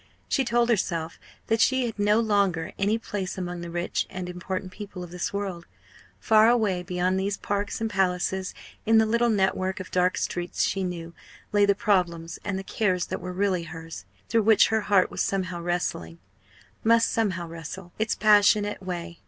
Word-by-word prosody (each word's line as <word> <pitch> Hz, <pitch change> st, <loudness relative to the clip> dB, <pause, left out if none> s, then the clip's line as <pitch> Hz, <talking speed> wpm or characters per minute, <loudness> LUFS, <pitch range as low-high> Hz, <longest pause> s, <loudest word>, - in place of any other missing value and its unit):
She 270 Hz, -, +1 dB
told 240 Hz, -1 st, +2 dB
herself 170 Hz, -7 st, -1 dB, 0.3 s
that 225 Hz, 0 st, +1 dB
she 260 Hz, +4 st, +3 dB
had 225 Hz, -3 st, -5 dB
no 210 Hz, +2 st, +3 dB
longer 200 Hz, -7 st, +1 dB
any 205 Hz, +3 st, +2 dB
place 200 Hz, -4 st, -5 dB
among 180 Hz, -1 st, -4 dB
the 170 Hz, -, -6 dB
rich 175 Hz, +1 st, -2 dB
and 185 Hz, -1 st, -5 dB
important 185 Hz, +1 st, -5 dB
people 200 Hz, -2 st, -8 dB
of 175 Hz, -, -10 dB
this 180 Hz, 0 st, -3 dB
world; 195 Hz, -4 st, -4 dB, 0.5 s
far 220 Hz, 0 st, +5 dB
away 215 Hz, -7 st, +2 dB
beyond 180 Hz, +1 st, 0 dB
these 200 Hz, +1 st, -1 dB
parks 205 Hz, 0 st, -2 dB
and 225 Hz, -, -1 dB
palaces, 190 Hz, -1 st, -1 dB, 0.3 s
in 225 Hz, +1 st, +4 dB
the 220 Hz, -, +5 dB
little 235 Hz, +2 st, +2 dB
network 190 Hz, -2 st, 0 dB
of 185 Hz, -, -8 dB
dark 180 Hz, 0 st, +2 dB
streets 175 Hz, 0 st, -2 dB
she 195 Hz, -, 0 dB
knew, 170 Hz, -2 st, -5 dB, 0.4 s
lay 205 Hz, -1 st, +4 dB
the 200 Hz, -, +4 dB
problems 175 Hz, -6 st, 0 dB
and 200 Hz, -2 st, -2 dB
the 190 Hz, -, -5 dB
cares 190 Hz, -3 st, 0 dB
that -, -, -5 dB
were 180 Hz, +1 st, -5 dB
really 185 Hz, -1 st, 0 dB
hers, 165 Hz, 0 st, -9 dB, 0.2 s
through 230 Hz, -, +2 dB
which 220 Hz, 0 st, +5 dB
her 220 Hz, 0 st, +1 dB
heart 200 Hz, -3 st, +3 dB
was -, -, -2 dB
somehow 185 Hz, -3 st, -2 dB
wrestling 170 Hz, -, -2 dB, 0.7 s
must 230 Hz, 0 st, +4 dB
somehow 185 Hz, -6 st, -1 dB
wrestle 170 Hz, +2 st, -8 dB
its 220 Hz, 0 st, +1 dB
passionate 210 Hz, -1 st, +4 dB
way. 175 Hz, -2 st, -6 dB
190 Hz, 180 wpm, -26 LUFS, 180-210 Hz, 0.7 s, far